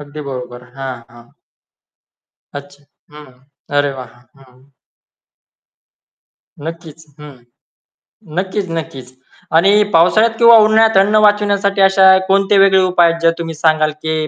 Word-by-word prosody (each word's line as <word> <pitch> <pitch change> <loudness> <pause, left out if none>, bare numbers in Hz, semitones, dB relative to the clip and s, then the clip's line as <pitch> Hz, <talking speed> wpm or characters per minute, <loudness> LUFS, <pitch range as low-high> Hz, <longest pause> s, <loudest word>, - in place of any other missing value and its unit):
अगदी 145 +1 -11
बरोबर. 125 -1 -9
हां. 135 -2 -7
हां. 120 0 -19 1.2
अच्छा. 140 0 -12 0.3
हं. 150 -3 -15 0.4
अरे 145 -1 0
वाह! 130 -3 -12 0.3
हं. 130 -1 -24 2.0
नक्कीच. 160 -1 -10 0.2
हं, 150 -1 -12 1.1
नक्कीच, 190 +1 -4
नक्कीच. 135 -6 -8 0.4
आणि 200 +5 +3
पावसाळ्यात 215 +7 +2
किंवा 235 -1 +6
उन्हाळ्यात 220 0 +2
अन्न 200 +2 +2
वाचविण्यासाठी 205 -1 0
अशा 190 0 +4
कोणते 195 +1 +1
वेगळे 195 -1 +3
उपाय 175 -2 +2
आहेत, 170 - -7
जे 165 0 +2
तुम्ही 165 -1 -6
सांगाल 155 0 0
की 160 -1 -3
165 Hz, 120 wpm, -14 LUFS, 145-195 Hz, 2.0 s, किंवा